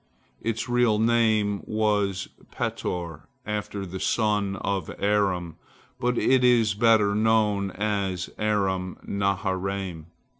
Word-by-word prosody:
Its 115 +1 -2
real 120 -3 +3
name 110 -3 +2
was 105 -3 0 0.2
Petor, 85 -3 -4 0.2
after 105 -1 -3
the 95 +1 -6
son 105 -3 +1
of 100 -1 -2
Aram, 95 -5 0 0.4
but 125 0 0
it 130 -1 +3
is 120 -3 +4
better 105 -1 +4
known 105 -2 +2
as 100 -3 -2
Aram 95 -4 0
naharaim. 95 -3 -2
105 Hz, 105 wpm, -25 LUFS, 95-110 Hz, 0.4 s, is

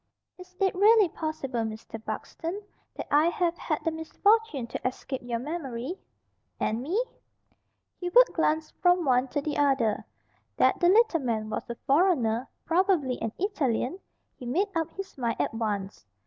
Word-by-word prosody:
"Is 365 0 -13
it 385 -1 +2
really 415 0 +5
possible, 305 -6 -4
Mr. 220 0 -5
Buxton, 345 - -5 0.3
that - - -5
I 300 +3 +5
have 345 0 0
had 305 - -2
the 325 - +1
misfortune 320 - +1
to 235 - -3
escape 260 +1 -5
your 240 -1 -2
memory?" 280 +2 -5 0.6
"And 225 +2 0
me?" 365 - 0 1.0
Hubert 370 +8 +5
glanced 315 -1 0
from 355 -1 +4
one 255 0 +3
to 290 - -2
the 295 0 -2
other. 265 -7 +2 0.5
That - - +3
the 350 - +4
little 425 -4 +4
man 220 -5 -2
was 215 - -4
a 235 - -3
foreigner, 270 -7 +2 0.2
probably 335 -7 +1
an 225 - -2
Italian, 335 - -1 0.4
he 250 - -9
made 360 +12 +1
up 325 -1 0
his 390 -7 -8
mind 235 -2 -1
at - - 0
once. 205 - -3
305 Hz, 155 wpm, -27 LUFS, 245-360 Hz, 1.0 s, really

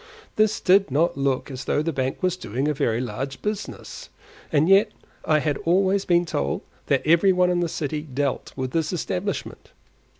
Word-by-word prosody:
This 215 0 +2
did 195 0 +4
not 155 +6 +1
look 135 0 -1
as 130 -1 -7
though 150 - +1
the 165 0 -2
bank 135 +5 -2
was 185 -1 +2
doing 135 - -3
a 150 - +1
very 115 -4 0
large 135 +2 -4
business; 210 0 -5 0.4
and 155 +1 +3
yet 195 +3 +5 0.4
I 155 - +3
had 150 -2 0
always 190 +3 +2
been 175 0 +3
told 70 - -2 0.3
that - - +1
every 170 +5 +5
one 180 -1 +3
in 175 - +1
the 175 -1 0
city 150 -1 -3
dealt 140 -2 -3
with 130 -1 -3
this 160 0 0
establishment. 185 +2 -4
160 Hz, 180 wpm, -24 LUFS, 135-185 Hz, 0.4 s, yet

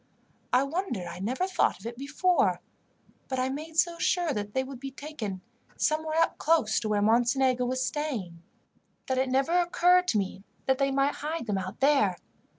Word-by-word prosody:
I 250 +2 +4
wonder 275 - -3
I 170 - -7
never 250 - -1
thought 370 - +1
of 195 - -14
it 235 +1 -5
before; 280 - +1 0.7
but 260 - -3
I 255 +1 0
made 310 +4 -6
so 340 0 +2
sure 345 -4 +1
that 205 0 -5
they 260 - +2
would 265 -1 -9
be 275 +1 -5
taken 260 -9 -6 0.4
somewhere 315 +1 +2
close 300 -9 +2
to 215 - -3
where 205 -1 +1
Mocenigo 245 +3 +3
was 255 +1 -1
staying, 225 - -4 0.6
that 260 -1 0
it 260 0 +1
never 270 +4 +1
occurred 355 +1 +3
to 220 - +2
me 195 -1 -3 0.2
that 265 0 +2
they 275 0 +2
might 275 +1 +1
hide 310 -1 -3
them 205 -3 -1
out 185 +2 -7
there. 280 0 +3
265 Hz, 180 wpm, -28 LUFS, 220-310 Hz, 0.7 s, I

